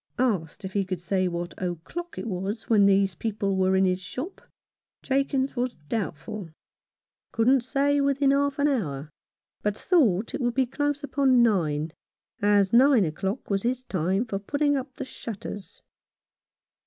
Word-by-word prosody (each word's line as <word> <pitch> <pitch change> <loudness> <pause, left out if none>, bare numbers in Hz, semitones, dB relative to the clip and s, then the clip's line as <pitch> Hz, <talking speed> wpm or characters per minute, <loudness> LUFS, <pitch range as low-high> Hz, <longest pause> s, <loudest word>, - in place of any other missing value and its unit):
Asked 200 -9 -1
if 190 - -6
he 200 - +1
could 185 -2 -4
say 185 +2 0
what 175 0 -4
o'clock 185 - -5
it - - -4
was 200 +2 -4
when 205 -3 +5
these 195 -1 +3
people 200 +1 -2
were 190 0 +2
in 190 0 +4
his 185 0 0
shop, 255 - -6 0.6
Jakins 270 0 0
was 245 0 -1
doubt 195 -10 -2
ful, 205 +1 -7 0.8
couldn't 250 +3 +3
say 280 +3 +1
within 280 0 +3
half 280 0 +1
an 285 0 +3
hour, 155 - -2 0.5
but 210 0 -1
thought 230 - +2
it - - -3
would 240 -1 0
be 265 -1 +3
close 290 +3 -2
upon 270 -4 +3
nine, 160 -8 +1 0.5
as 205 -1 +3
nine 250 -3 +6
o'clock 195 - -3
was 195 0 +1
his 250 +3 -1
time 190 +1 0
for 200 -4 -3
putting 285 +7 +1
up 265 0 -3
the - - -5
shutters. 205 -5 -8
215 Hz, 160 wpm, -26 LUFS, 190-270 Hz, 0.8 s, nine